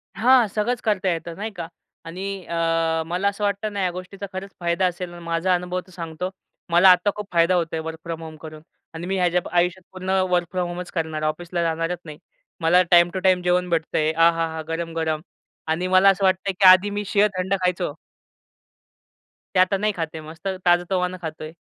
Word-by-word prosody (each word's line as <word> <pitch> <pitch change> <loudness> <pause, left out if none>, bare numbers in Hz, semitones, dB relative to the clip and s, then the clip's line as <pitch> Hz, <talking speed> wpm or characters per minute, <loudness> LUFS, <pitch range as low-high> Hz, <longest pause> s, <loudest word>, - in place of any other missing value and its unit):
हां. 245 0 +5
सगळंच 215 +5 -1
करता 205 -4 0
येतं, 165 0 -4
नाही 215 +3 -4
का? 175 -5 -6 0.4
आणि 190 +3 -6
अ, 165 -1 0
मला 180 +4 -1
असं 200 +1 -2
वाटतं 205 +1 -1
ना 200 - -2
या 180 - +1
गोष्टीचा 185 +3 -7
खरंच 190 +1 -6
फायदा 175 +1 +1
असेल 180 0 -5
आणि 175 0 -11
माझा 170 +2 0
अनुभव 180 +1 -3
तर - - -17
सांगतो. 170 0 -5 0.4
मला 175 +3 +7
आता 185 +3 +5
खूप 210 -1 -6
फायदा 170 +2 +4
होत 175 -2 +2
आहे 160 - -1
वर्क 160 0 -6
फ्रॉम 165 -1 -5
होम 160 -1 -9
करून. 155 -1 -10 0.3
आणि 165 +2 -6
मी 195 +1 -1
ह्याच्या 180 -1 +2 0.2
आयुष्यात 180 +1 +1
पूर्ण 185 0 -7 0.2
वर्क 175 -1 +2
फ्रॉम 180 -1 -1
होमचं 175 +1 -6
करणार. 160 -2 -2
ऑफिसला 170 +3 -2
जाणारच 165 +1 -1
नाही. 155 -2 -9 0.4
मला 170 +3 +5
टाईम 175 0 +7
टू 190 - -2
टाईम 185 -1 +3
जेवण 180 0 +1
भेटतंय. 160 -2 0
आहाहा! 165 -1 +2
गरम-गरम. 165 -1 -2 0.5
आणि 165 +3 0
मला 185 +1 +6
असं 195 0 +1
वाटतंय 190 +1 +1
की 195 - +4
आधी 185 +2 +7
मी 205 0 -3
शिळं-थंड 195 -2 +1
खायचो. 180 -3 0 1.6
ते - - +4
आता 185 +2 +4
नाही 210 +2 0
खात 165 - 0
आहे. 160 - -6
मस्त 165 +4 -8 0.2
ताजं-तवानं 180 +1 +2
खातोय. 155 0 -7
180 Hz, 190 wpm, -23 LUFS, 165-190 Hz, 1.6 s, मला